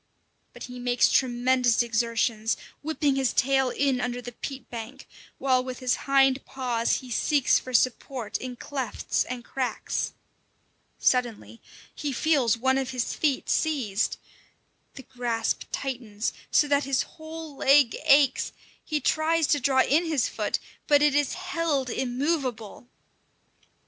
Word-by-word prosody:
But -, -, -11 dB
he 250 Hz, 0 st, -8 dB
makes 245 Hz, -1 st, +2 dB
tremendous 245 Hz, -2 st, +2 dB
exertions, 230 Hz, -1 st, 0 dB, 0.2 s
whipping 295 Hz, -2 st, 0 dB
his 265 Hz, -2 st, +1 dB
tail 265 Hz, 0 st, +2 dB
in 265 Hz, -1 st, 0 dB
under 245 Hz, 0 st, -2 dB
the 245 Hz, 0 st, -8 dB
peat 265 Hz, +1 st, -7 dB
bank, 240 Hz, +3 st, -8 dB, 0.3 s
while 255 Hz, -2 st, +2 dB
with 255 Hz, -1 st, -6 dB
his 255 Hz, -2 st, +1 dB
hind 270 Hz, -1 st, +4 dB
paws 245 Hz, -3 st, -1 dB
he 255 Hz, -1 st, -11 dB
seeks 280 Hz, +3 st, +2 dB
for 255 Hz, -, -9 dB
support 250 Hz, -1 st, 0 dB
in 255 Hz, -1 st, -6 dB
clefts 265 Hz, 0 st, -2 dB
and 245 Hz, -1 st, -6 dB
cracks. 260 Hz, -2 st, -3 dB, 0.8 s
Suddenly 240 Hz, -2 st, 0 dB, 0.3 s
he 295 Hz, -2 st, -3 dB
feels 265 Hz, -5 st, +2 dB
one 265 Hz, +3 st, +2 dB
of 265 Hz, -1 st, -3 dB
his 255 Hz, -3 st, -2 dB
feet 290 Hz, -4 st, 0 dB
seized. 255 Hz, -11 st, 0 dB, 0.8 s
The 265 Hz, -, -9 dB
grasp 235 Hz, -2 st, -2 dB
tightens, 240 Hz, -5 st, -3 dB, 0.2 s
so 295 Hz, -, +3 dB
that 285 Hz, 0 st, +2 dB
his 270 Hz, -1 st, +1 dB
whole 315 Hz, -2 st, -10 dB
leg 275 Hz, -3 st, +4 dB
aches; 275 Hz, -2 st, +4 dB, 0.3 s
he 305 Hz, -1 st, -1 dB
tries 320 Hz, +2 st, +2 dB
to 290 Hz, -, +3 dB
draw 265 Hz, 0 st, +3 dB
in 320 Hz, +5 st, +2 dB
his 310 Hz, -6 st, +1 dB
foot, -, -, -2 dB, 0.3 s
but 290 Hz, -1 st, +5 dB
it 295 Hz, -2 st, +4 dB
is 290 Hz, -1 st, +1 dB
held 330 Hz, -8 st, -1 dB
immovable. 255 Hz, -4 st, -2 dB
260 Hz, 140 wpm, -26 LUFS, 245-285 Hz, 0.8 s, but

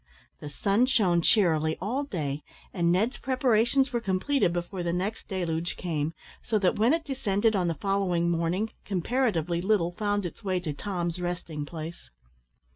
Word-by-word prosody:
The 150 Hz, -, -7 dB
sun 200 Hz, -, +2 dB
shone 185 Hz, -9 st, +3 dB
cheerily 160 Hz, -5 st, +3 dB
all 245 Hz, +9 st, -1 dB
day, 150 Hz, -, -3 dB, 0.3 s
and 170 Hz, -2 st, +2 dB
Ned's 220 Hz, +9 st, +1 dB
preparations 255 Hz, 0 st, +2 dB
were 235 Hz, -, 0 dB
completed 195 Hz, +2 st, +1 dB
before 175 Hz, +2 st, -3 dB
the 170 Hz, -1 st, -1 dB
next 190 Hz, +5 st, -3 dB
deluge 170 Hz, -3 st, -2 dB
came, 160 Hz, -2 st, -2 dB, 0.3 s
so 225 Hz, -, 0 dB
that 190 Hz, -3 st, +2 dB
when 230 Hz, +4 st, +4 dB
it 325 Hz, 0 st, +1 dB
descended 225 Hz, -5 st, +1 dB
on 180 Hz, -3 st, +1 dB
the 165 Hz, -, 0 dB
following 185 Hz, -1 st, 0 dB
morning, 170 Hz, +6 st, 0 dB
comparatively 180 Hz, -, 0 dB
little 185 Hz, -3 st, +2 dB
found 205 Hz, +1 st, -1 dB
its 175 Hz, -, -7 dB
way 185 Hz, -2 st, 0 dB
to 155 Hz, -4 st, -3 dB
Tom's 175 Hz, 0 st, -3 dB
resting 170 Hz, -4 st, -4 dB
place. 165 Hz, +1 st, -8 dB
185 Hz, 160 wpm, -28 LUFS, 170-220 Hz, 0.3 s, when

